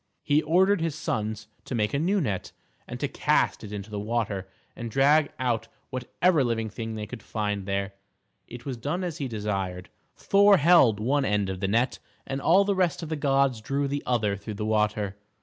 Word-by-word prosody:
He 145 +1 +3
ordered 185 +4 +3
his 165 -3 -1
sons 110 -8 -3 0.2
to 130 - -4
make 105 -2 0
a 140 - +1
new 190 +6 +2
net, 105 - -2 0.4
and - - -6
to - - 0
cast - - +1
it 105 - -8
into 105 +1 -6
the 105 - -3
water, 105 -3 -2 0.3
and 120 -2 -5
drag 145 +5 +4
out 120 -3 -1 0.2
whatever 140 +5 +1
living 115 -3 -1
thing 115 -1 -5
they 105 -1 -4
could 105 - -9
find 105 -2 -3
there. 100 0 -2 0.5
It 120 +1 -10
was 135 -3 -4
done 150 +10 -2
as 170 -3 -4
he 140 - -2
desired. 95 -5 -3 0.2
Thor 200 0 +5
held 145 - +5
one 135 +6 +1
end 105 -5 0
of 95 - -5
the 95 - -1
net, 115 +6 +1 0.3
and 135 0 -4
all 185 +7 +5
the 200 - +2
rest 180 -3 0
of 160 - -6
the 160 - -1
gods 135 -4 +1
drew 140 +5 -1
the 140 +1 -2
other 110 -5 +1
through 105 +2 -7
the 105 - -3
water. 105 -2 0
120 Hz, 200 wpm, -26 LUFS, 105-145 Hz, 0.5 s, Thor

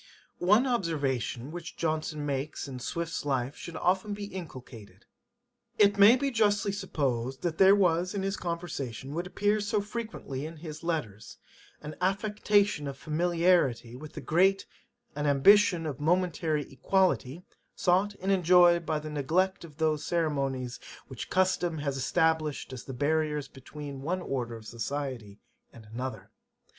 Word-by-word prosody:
One 210 +8 +4
observation 145 - -1
which 170 -1 -8
Johnson 155 -2 -2
makes 140 +1 -3
in 130 -2 -7
Swift's 170 +6 -3
life 135 -1 -1
should 170 - -9
be - - -3
often 190 +3 +1
inculcated: 130 - -9 0.7
'It 205 -1 +4
may 205 +4 +9
be 275 +1 -1
justly 205 -3 +2
supposed, 135 -10 -2
that 165 -2 -2
there 195 +1 +8
was 180 -1 +2
in 195 - -2
his 195 0 -1
conversation 145 - -5
what 170 +3 -3
appears 205 +2 0
so 210 - +1
frequently 205 - -5
in 160 +1 -7
his 155 -1 -8
letters, 115 -11 -4 0.5
an 150 +1 -7
affectation 205 -3 +1
of 135 -1 -6
familiarity 165 -7 +1
with 150 +4 -10
the - - -7
great, 190 +4 +2 0.5
an 150 0 -1
ambition 170 +4 +5
of 150 -3 -4
momentary 165 -2 +1
equality, 175 -1 +1 0.3
sought 190 +3 +2
and 190 +2 -1
enjoyed 175 -2 +5
by 155 - +1
the 155 0 -6
neglect 170 +7 0
of 155 -3 -12
those 155 -2 +1
ceremonies 135 -7 -1 0.3
which 130 -4 -7
custom 180 -3 +1
has 145 -2 -2
established 155 0 0
as 125 - -8
the - - -6
barriers 150 +1 0
between 140 +1 -9
one 180 +5 -2
order 120 -3 -3
of 110 -1 -11
society 120 -3 -5 0.3
and 115 -2 -14
another. 115 -1 -6
160 Hz, 145 wpm, -29 LUFS, 135-185 Hz, 0.7 s, may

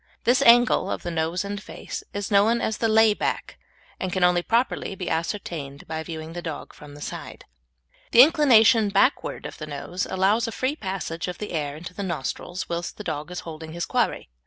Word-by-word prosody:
This 250 +3 +3
angle 240 -1 +5
of - - -3
the 175 - -3
nose 165 +3 -1
and 200 0 -4
face - - -7
is 205 0 -4
known 210 +4 +4
as 220 - -2
the 225 - +2
lay 220 0 +5
back, - - -3 0.4
and 185 - -3
can 185 0 0
only 180 0 +4
properly 230 -1 0
be 180 -2 -4
ascertained 160 -5 -4
by 160 0 -3
viewing 160 0 -7
the 175 - -5
dog 160 -3 -6
from 145 -1 -13
the 145 - -12
side. - - -7 0.6
The 240 - +9
inclination 235 -8 +5
backward 210 +8 +1
of - - -8
the 155 - -6
nose 165 +5 -4
allows 200 +5 +2
a - - -3
free 260 +5 -1
passage 190 - -4
of 180 - -5
the 210 - -6
air 150 -3 -3
into 175 +3 -9
the 200 - -6
nostrils 175 +1 -4
whilst 170 0 -4
the 210 - -7
dog 155 -3 -4
is 180 -1 -5
holding 160 -1 -8
his 170 0 -3
quarry. - - -1
180 Hz, 205 wpm, -24 LUFS, 165-220 Hz, 0.6 s, The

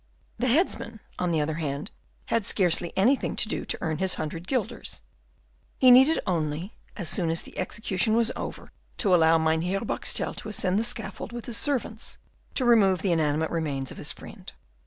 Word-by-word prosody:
The 255 - +1
headsman, 245 - +1 0.2
on 180 -1 0
the 160 -2 +2
other 155 +1 -1
hand, 145 +4 -3 0.3
had 230 -2 0
scarcely 175 -3 +2
anything 250 +8 +2
to - - +2
do - - -3
to - - -2
earn 160 -2 -2
his 190 -1 +2
hundred 165 +3 -5
guilders. 235 -1 -2 0.8
He 255 -1 +7
needed 265 +6 +7
only, 165 0 -2 0.2
as 180 - -4
soon 170 -1 0
as 165 0 -1
the - - -13
execution 200 +2 -1
was 235 +1 +3
over, - - -6 0.3
to 195 -5 +3
allow 165 -1 +6
Mynheer 160 +4 +1
Boxtel 230 - -1
to - - -6
ascend 195 -1 0
the - - 0
scaffold 225 -3 -4
with 240 -1 -7
his 240 - -3
servants, 240 -6 -2 0.4
to 255 - +1
remove 200 -6 +4
the 195 - +2
inanimate 155 -1 +1
remains 145 -5 -2
of - - -10
his - - -3
friend. - - -10
190 Hz, 180 wpm, -26 LUFS, 160-230 Hz, 0.8 s, He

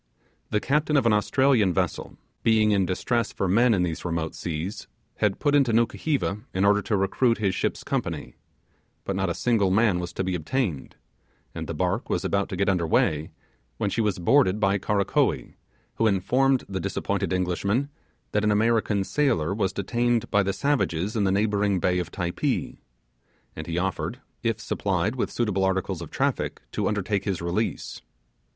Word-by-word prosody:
The 105 - +1
captain 150 +4 +1
of 135 - +2
an 115 - +4
Australian 105 -3 +3
vessel, - - -2 0.2
being 110 -1 +3
in 95 -3 +2
distress 115 +5 -1
for 95 - -2
men 115 +6 +4
in 90 - +1
these 85 -3 -3
remote 85 -2 -2
seas, 90 +6 -5 0.3
had 105 -2 +1
put 145 - +1
into 135 -5 +3
Nukuheva 120 -1 0 0.2
in 95 +2 +2
order 100 0 +4
to 105 - 0
recruit 115 +5 +2
his 100 -3 0
ship's - - -2
company; - - -3 0.7
but 95 - -2
not 95 -1 0
a 85 - -2
single 110 -6 +2
man 100 -1 +3
was 90 -1 -4
to 95 - -2
be 95 0 -2
obtained; 90 - -2 0.6
and - - -5
the - - -4
barque - - -1
was - - -1
about 100 0 0
to - - -4
get 100 +2 0
under 90 -4 +1
weigh, 75 0 +1 0.5
when 100 - -1
she 115 - 0
was 105 -3 0
boarded 105 +2 +3
by 100 -1 +2
Karakoee, 100 0 0 0.4
who 115 - +3
informed 125 +7 +2
the 95 -1 -3
disappointed 100 -1 -2
Englishman 95 +8 0 0.4
that 105 - +1
an 105 - +3
American 110 -1 +2
sailor 100 - +1
was 100 -2 0
detained 120 +3 0
by 100 - +4
the 100 0 0
savages 105 - 0
in 105 -3 +1
the 95 - +2
neighbouring 100 -1 +1
bay 90 +1 +1
of 90 - -3
Typee; 90 -2 -2 0.8
and 80 - -7
he 85 0 -2
offered, 95 +4 -2 0.2
if 115 -2 -1
supplied 100 +1 -1
with 125 - -1
suitable 105 -5 0
articles 95 -2 -1
of 85 - -7
traffic, - - -1
to - - -1
undertake 100 -1 -1
his 95 -4 -1
release. 85 +6 -3
100 Hz, 175 wpm, -25 LUFS, 95-115 Hz, 0.8 s, an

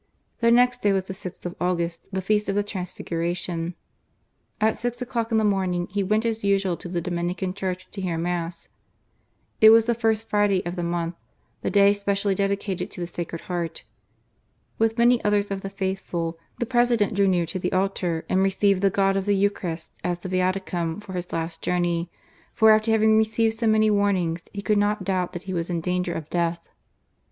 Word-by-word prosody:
The 230 - +3
next 245 +1 +4
day 205 -1 +3
was 190 -1 +1
the 190 - -7
6th 185 -2 -9
of 175 - -4
August, 170 -2 -1
the 190 -1 -2
feast 210 +1 +1
of 195 - 0
the 205 - +2
Transliguration. 175 -2 -3 0.8
At 220 +1 +2
six 240 0 -3
o'clock 235 -2 -2
in 225 - +3
the 220 - +3
morning 185 -4 +1
he 200 +1 0
went 215 +4 +1
as 225 -1 -1
usual 195 -2 +2
to 175 - -8
the 175 -1 -2
Dominican 175 +2 -2
Church 185 -1 -4
to 195 - -6
hear 175 -3 -2
Mass. 170 0 -3 0.9
It 220 - +10
was 225 0 +7
the 235 - +2
First 225 -1 0
Friday 205 -3 +2
of 175 +1 -3
the 175 - -3
month, 170 0 -2 0.5
the - - -1
day 200 0 +5
specially 200 0 0
dedicated 195 -1 -1
to - - -9
the 175 - -2
Sacred 170 -1 -6
Heart. 170 -2 -4 1.0
With 225 +1 +2
many 240 0 +4
others 205 -1 +1
of 195 -1 -2
the 195 - -5
faithful, 190 -4 -3 0.2
the 240 - -1
President 240 -4 +2
drew 200 0 +3
near 180 -2 +2
to 185 +3 -4
the 180 - -2
altar, 185 -3 -1
and 190 - +2
received 195 0 +2
the 200 - +4
God 195 0 +2
of 195 0 -1
the 205 - +3
Eucharist, 185 -5 -1
as 175 -1 -1
the 180 +2 -7
Viaticum 185 -2 -1
for 210 -2 -9
his 180 -1 -5
last 165 0 -4
journey, 175 -1 0 0.5
for 220 0 +6
after 215 +1 +3
having 220 0 +4
received 220 0 +2
so 230 - +1
many 215 0 +4
warnings, 190 -5 +1
he 200 -1 -6
could 210 -1 +2
not 205 -1 +1
doubt 185 -1 -1
that 175 0 -6
he 190 -1 -5
was 170 -1 -2
in 175 -1 -1
danger 180 +1 -1
of 155 - -5
death. 170 -1 -1
190 Hz, 200 wpm, -24 LUFS, 175-210 Hz, 1.0 s, It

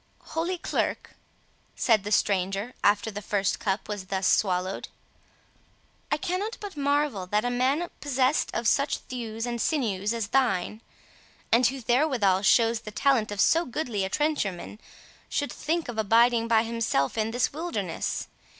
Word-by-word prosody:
"Holy 340 +3 -1
Clerk," - - -2 0.6
said 220 -5 +3
the 205 - -5
stranger, 195 +3 +1
after 205 +2 +3
the 205 0 -6
first 200 -1 0
cup 200 -3 -2
was 205 -3 -5
thus 190 0 -2
swallowed, 185 -1 +1 1.2
"I 295 - +2
cannot 380 +7 -3
but 405 -4 -7
marvel 285 -9 0
that 210 +4 0
a 245 - 0
man 265 +7 +1
possessed 270 0 +1
of - - -1
such - - +2
thews 225 -2 -5
and 240 -1 -3
sinews 215 - 0
as 230 -3 -2
thine, 220 -5 +1 0.7
and 235 +1 +5
who 270 +1 -4
therewithal 240 -7 +2
shows 230 +2 +4
the 220 - -9
talent 235 0 +2
of 205 - -5
so 330 +9 +4
goodly 240 - -3
a 190 - -2
trencher 295 -4 0
man, 180 +4 -10 0.5
should 285 - -1
think 330 +2 -2
of 235 -2 -4
abiding 230 +2 +4
by 225 -1 +4
himself 225 -12 0
in 220 -1 0
this 245 +3 0
wilderness. 220 - -3
230 Hz, 155 wpm, -27 LUFS, 205-275 Hz, 1.2 s, and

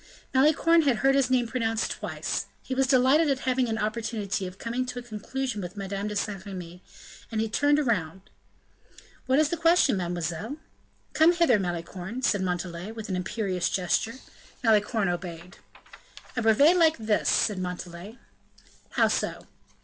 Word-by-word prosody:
Malicorne 310 +5 +4
had 275 -5 +2
heard 270 - +6
his 270 -2 +2
name 255 -2 +2
pronounced 225 -2 -1
twice; - - -3 0.2
he - - -4
was 265 0 +2
delighted 270 +4 +4
at 270 -1 0
having 255 -1 +1
an 220 - -1
opportunity 215 -3 -2
of 180 +1 -10
coming 235 +4 -2
to 250 -1 -6
a 245 - -5
conclusion 240 +1 -4
with 180 +3 -7
Madame 200 +1 -3
de 210 - -4
Saint 200 -1 -3
Remy, 180 -3 -8 0.5
and 220 - -2
he 225 - +1
turned 290 +6 +2
round: 190 -5 -2 1.0
"What 260 +1 +3
is 305 -1 +3
the 340 - -2
question, 330 - +4
mademoiselle?" 175 - -3 0.6
"Come 320 +3 +5
hither, 335 -11 +3
Malicorne," 180 +6 -5
said 205 -5 +2
Montalais, 180 +1 -3
with 220 -2 -8
an 185 - -1
imperious 185 -1 -1
gesture. 195 +5 0 0.5
Malicorne 215 -2 +2
obeyed. 175 0 -5 0.8
"A 245 - 0
brevet 280 +11 +5
like 320 -2 +4
this," 220 -1 0
said 205 -4 +2
Montalais. 180 +3 -6 0.8
"How - - +4
so?" - - -2
220 Hz, 155 wpm, -27 LUFS, 185-260 Hz, 1.0 s, heard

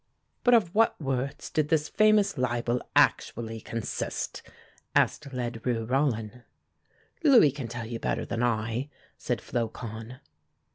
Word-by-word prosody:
"But 245 -1 +6
of 195 -7 +2
what 225 +2 +3
words 135 0 -3
did 150 -1 0
this 155 -1 +2
famous 215 -1 +3
libel 120 -2 0
actually 115 -1 +2
consist?" 115 0 -4 0.5
asked 150 - +2
Ledru 120 -2 -2
Rollin. 125 -3 0 0.8
"Louis 250 - +7
can 135 -3 -6
tell 115 0 -5
you 115 0 -5
better - - -1
than 115 - -3
I," 115 +3 -1 0.3
said - - -2
Flocon. 115 +1 -5
125 Hz, 125 wpm, -28 LUFS, 115-150 Hz, 0.8 s, Louis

